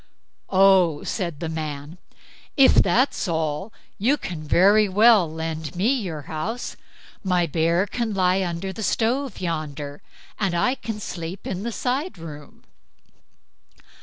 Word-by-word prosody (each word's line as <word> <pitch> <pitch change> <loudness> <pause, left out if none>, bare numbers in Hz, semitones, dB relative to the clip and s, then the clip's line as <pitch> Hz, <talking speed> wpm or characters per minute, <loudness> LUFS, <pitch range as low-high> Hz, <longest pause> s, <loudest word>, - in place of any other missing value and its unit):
"Oh?" 185 -5 +4
said 170 -7 -3
the 165 - -2
man, 155 0 -5 0.6
"if 270 -2 +7
that's 225 +4 +3
all, 160 +3 -2 0.3
you 260 +9 +3
can 170 - -6
very 200 +7 +4
well 205 -4 +5
lend 160 -1 -5
me 210 +9 +2
your 175 - -4
house; 190 - -4 0.5
my 180 -3 +2
bear 165 +3 +1
can 230 +2 -3
lie 190 -1 +2
under 180 +2 -3
the 220 - -7
stove 235 +4 0
yonder, 150 -4 -4 0.4
and 195 -4 0
I 250 +9 +2
can 225 -5 -6
sleep 175 -2 -6
in 190 0 -3
the 235 +3 -3
side 265 - -2
room." 150 -3 -11
180 Hz, 135 wpm, -23 LUFS, 160-215 Hz, 0.6 s, if